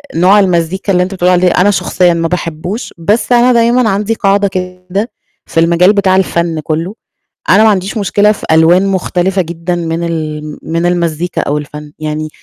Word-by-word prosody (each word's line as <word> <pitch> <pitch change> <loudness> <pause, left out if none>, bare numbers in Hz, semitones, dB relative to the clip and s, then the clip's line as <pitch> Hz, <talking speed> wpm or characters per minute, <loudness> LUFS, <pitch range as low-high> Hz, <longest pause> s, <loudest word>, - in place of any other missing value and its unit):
نوع 185 +5 +4
المزيكا 185 +1 0
اللي 180 0 +3
أنت 190 +2 -5
بتقول 180 -1 +1
عليه 180 0 +3
أنا 200 +3 +3
شخصيًا 180 -2 +1
ما 165 0 -1
باحبوش، 175 +5 -4
بس 205 +9 -1
أنا 245 +1 +4
دايمًا 235 0 +2
عندي 205 +3 -1
قاعدة 200 -1 +1
كده 185 +4 -4 0.3
في - - -2
المجال 170 +4 +4
بتاع 195 -2 +2
الفن 170 -3 0
كُلّه، 165 +6 -3 0.5
أنا 215 - +5
ما 220 - +5
عنديش 195 +3 -1
مشكلة 205 +1 +2
في 210 - -6
ألوان 170 +4 +4
مختلفة 190 0 0
جدًا 170 +1 -4
من 165 0 -3
ال 155 -2 -4
من 165 +1 -2
المزيكا 170 -1 -1
أو 145 - -2
الفن، 150 0 -8
يعني 155 0 -4
180 Hz, 175 wpm, -12 LUFS, 165-195 Hz, 0.5 s, أنا